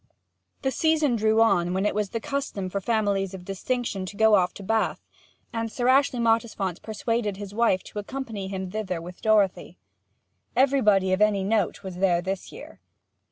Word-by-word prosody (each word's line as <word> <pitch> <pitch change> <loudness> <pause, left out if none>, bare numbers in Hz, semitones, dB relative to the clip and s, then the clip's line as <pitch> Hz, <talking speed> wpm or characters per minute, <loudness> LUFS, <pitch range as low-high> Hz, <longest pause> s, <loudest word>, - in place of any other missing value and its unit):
The 265 - +1
season 315 -4 +2
drew 220 0 +3
on 180 -5 +3
when 190 +2 0
it - - +1
was 210 -1 -1
the 230 - -3
custom 275 -8 -3
for 200 - -2
families 200 -3 0
of 180 -1 -10
distinction 200 +1 -2
to 200 - -9
go 220 -1 +5
off 180 -3 +4
to 200 - -9
The - - -11
Bath, 225 0 0 0.5
and 230 -1 -2
Sir 245 +1 -1
Ashley 270 -1 +4
Mottisfont 225 -6 0
persuaded 220 -2 -2
his 200 -1 -8
wife 220 -4 +2
to 210 - -7
accompany 220 -3 -5
him 190 -1 -5
thither 190 -5 -3
with 175 +2 -10
Dorothy. 200 -5 +1 0.8
Everybody 215 -8 +3
of 185 - 0
any 210 -2 +3
note 205 -1 0
was 185 -2 -7
there 180 -2 +3
this 190 +2 -4
year. - - -11
210 Hz, 180 wpm, -25 LUFS, 190-230 Hz, 0.8 s, go